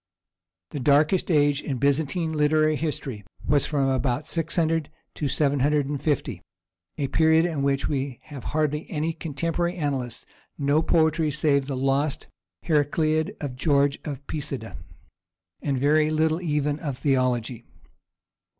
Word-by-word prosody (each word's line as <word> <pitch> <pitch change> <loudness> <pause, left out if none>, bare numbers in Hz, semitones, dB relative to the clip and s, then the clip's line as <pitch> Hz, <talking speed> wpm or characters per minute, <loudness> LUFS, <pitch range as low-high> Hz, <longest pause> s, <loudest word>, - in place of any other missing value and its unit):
The 145 - -4
darkest 150 +8 +3
age 145 -3 +3
in 135 - -3
Byzantine 155 +4 0
literary 155 +1 +3
history 140 -8 -4 0.2
was 145 -1 +2
from 140 -3 +1
about 130 -1 0
600 165 -1 -1 0.2
to 150 - -2
750, 140 - 0 0.6
a 140 - -1
period 160 +3 +4
in 160 -5 -2
which 140 0 +1
we 135 -3 -2
have 140 -4 -10
hardly 150 0 -1
any 160 +1 -1
contemporary 165 +3 -2
annalists, 135 -8 -3 0.3
no 145 +2 +2
poetry 160 -1 +2
save 140 -2 +1
the 135 -2 -3
lost 135 +2 0 0.4
Heracliad 155 0 +1
of 140 -4 -4
George 140 0 +2
of 140 -2 -6
Pisidia, 135 -6 -5 0.9
and 140 -3 -1
very 150 +3 +3
little 160 +2 +1
even 150 -3 0
of 140 -6 -4
theology. 125 -4 0
145 Hz, 125 wpm, -25 LUFS, 135-155 Hz, 0.9 s, period